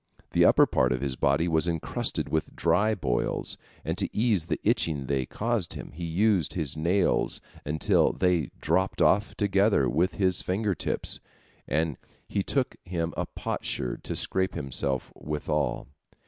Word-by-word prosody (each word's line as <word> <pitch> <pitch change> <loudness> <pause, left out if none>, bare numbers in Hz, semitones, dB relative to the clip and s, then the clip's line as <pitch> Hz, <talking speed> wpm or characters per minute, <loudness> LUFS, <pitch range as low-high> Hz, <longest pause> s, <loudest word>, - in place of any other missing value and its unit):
The - - +4
upper - - +6
part 65 - +1
of 65 - -3
his 70 -2 -1
body 70 +6 +2
was 80 0 +2
encrusted 85 -2 -1
with 80 -1 -2
dry 110 +3 +2
boils, 65 -10 -1 0.3
and - - -1
to - - 0
ease 105 -7 +2
the - - -1
itching 75 -4 +1
they 65 -2 -1
caused 115 -5 -1
him, - - -8
he 85 +3 -6
used 95 0 +2
his 80 -6 -1
nails, 90 +5 +1 0.3
until 75 +2 +3
they 90 -6 +1
dropped 95 +1 0
off 100 +1 +3
together 100 - +3
with 85 +8 +1
his 95 -2 +3
fingertips, 100 0 -1 0.5
and 80 -2 0 0.3
he 100 - -1
took 130 +6 -1
him 85 -2 -3
a - - -2
potsherd - - -3
to - - -3
scrape 95 0 0
himself 70 -1 -2
withal. 75 0 -2
85 Hz, 150 wpm, -27 LUFS, 75-95 Hz, 0.5 s, upper